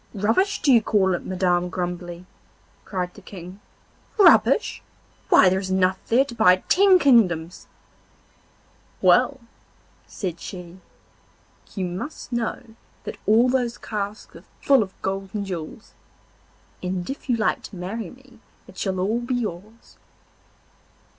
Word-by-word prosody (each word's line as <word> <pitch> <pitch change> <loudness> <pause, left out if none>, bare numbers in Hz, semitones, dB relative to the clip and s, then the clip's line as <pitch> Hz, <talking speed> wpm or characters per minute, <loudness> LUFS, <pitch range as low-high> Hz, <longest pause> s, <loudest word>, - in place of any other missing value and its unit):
'Rubbish, 225 - +1
do 275 - +5
you 230 - +6
call 195 -3 +2
it, 175 - -4
Madam 180 -1 0
Grumbly?' 175 -1 -5 0.6
cried 180 -2 -4
the 205 - -14
King. 185 0 -11 0.6
'Rubbish! 390 -5 +4 0.5
why - - +6
there 190 +1 +2
is 190 -1 -5
enough 185 0 +1
there 255 +4 +3
to 250 - -9
buy 220 -6 +5
ten 385 0 +5
kingdoms.' 185 - +2 1.3
'Well,' 275 -3 +3 0.7
said 175 -4 -5
she, 180 -1 -9 1.0
'you 190 -3 -2
must 185 - -6
know 235 0 -2 0.4
that - - -7
all 225 +4 +5
those 250 -2 0
casks 210 -1 -6
are - - -13 0.2
full 275 -3 +4
of 190 -3 -6
gold 195 0 -3
and 205 -1 -2
jewels, 180 +3 -7 0.9
and 180 -1 -3
if 270 0 -7
you 245 - +3
like 220 - 0
to - - -10
marry 185 +3 -5
me 255 -2 -18 0.3
it 190 - -12
shall 190 -2 -2
all 210 +6 0
be 245 +1 -2
yours. 215 0 -6
195 Hz, 135 wpm, -23 LUFS, 180-235 Hz, 1.3 s, you